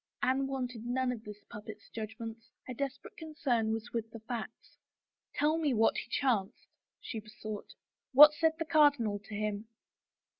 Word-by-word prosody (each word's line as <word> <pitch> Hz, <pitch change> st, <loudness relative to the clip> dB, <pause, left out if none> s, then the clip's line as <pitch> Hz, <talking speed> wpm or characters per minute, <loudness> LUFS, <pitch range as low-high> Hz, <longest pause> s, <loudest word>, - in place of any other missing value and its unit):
Anne 265 Hz, +1 st, +2 dB
wanted 250 Hz, -4 st, -4 dB
none 250 Hz, +1 st, 0 dB
of 230 Hz, -3 st, -6 dB
the 210 Hz, -1 st, -8 dB
puppet's 210 Hz, 0 st, -10 dB
judgments; 225 Hz, +1 st, -7 dB, 0.2 s
her 255 Hz, -, -5 dB
desperate 275 Hz, +1 st, -5 dB
concern 290 Hz, -9 st, 0 dB
was 225 Hz, +1 st, -3 dB
with 225 Hz, -1 st, -2 dB
the 230 Hz, -, -9 dB
facts. 230 Hz, 0 st, -7 dB, 0.6 s
Tell 305 Hz, +3 st, +2 dB
me 295 Hz, -6 st, +1 dB
what 225 Hz, +1 st, +4 dB
has -, -, -4 dB
chanced," 220 Hz, -8 st, 0 dB, 0.3 s
she 225 Hz, -, -5 dB
besought. 215 Hz, -1 st, -8 dB, 0.2 s
" -, -, -61 dB
What 295 Hz, +3 st, +10 dB
said 320 Hz, +1 st, +2 dB
the 325 Hz, -, -2 dB
cardinal 290 Hz, -10 st, +4 dB
to 205 Hz, +1 st, -9 dB
him?" 210 Hz, +1 st, -2 dB
235 Hz, 160 wpm, -32 LUFS, 215-275 Hz, 0.6 s, What